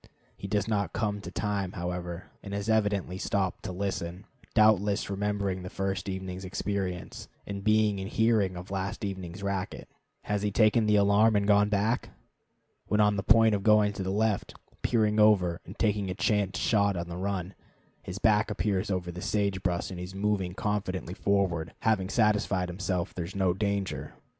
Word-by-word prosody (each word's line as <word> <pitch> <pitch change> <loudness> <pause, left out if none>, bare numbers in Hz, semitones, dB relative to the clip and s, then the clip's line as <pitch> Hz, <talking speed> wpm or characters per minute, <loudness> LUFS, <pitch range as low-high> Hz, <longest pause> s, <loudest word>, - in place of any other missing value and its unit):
He 100 - -7
does 105 +1 0
not 100 -5 -1
come 105 -1 -1
to 90 - -7
time, 100 -1 -2
however, 90 -1 -5
and 100 -1 -6
has 100 +2 -3
evidently 105 -4 0
stopped 95 -3 -1
to 95 - -3
listen; 90 0 -4 0.3
doubtless 105 -2 +3
remembering 100 -1 -1
the 90 - -6
first 95 +1 -3
evening's 95 0 -5
experience, 95 -1 -4 0.2
and 100 -1 -5
being 110 -1 +3
in 95 - -4
hearing 110 -4 +2
of 90 +2 -9
last 95 +1 -3
evening's 95 -1 -6
racket. 100 -1 -3 0.4
Has 105 -1 -1
he 105 - +1
taken 110 +1 +3
the 105 - +4
alarm 105 +2 +4
and 100 0 +2
gone 105 0 +4
back? 105 +4 0 0.8
When 105 - +1
on 105 -1 +4
the 100 - -1
point 110 +1 +5
of 100 - 0
going 105 0 +4
to 100 - -6
the 95 - -2
left, 105 +1 0 0.3
peering 110 -2 +2
over, 95 -5 +4
and - - -10
taking 105 -3 +1
a 90 - -3
chance 105 -2 +1
shot 100 -3 +2
on 85 0 -3
the 85 - -6
run, 95 -1 -3 0.5
his 90 - -7
back 105 0 +3
appears 100 -1 -1
over 90 -2 -2
the 90 +1 -7
sage 100 -3 0
brush 90 0 -1
and 90 - -6
he - - -4
is 90 +1 -8
moving 100 -3 -1
confidently 95 -4 -2
forward, 90 -3 0
having 100 -4 +1
satisfied 100 -4 +2
himself 90 -1 -2
there 85 - -4
is 95 - -9
no 95 -2 +2
danger. 100 0 -2
100 Hz, 180 wpm, -28 LUFS, 95-105 Hz, 0.8 s, point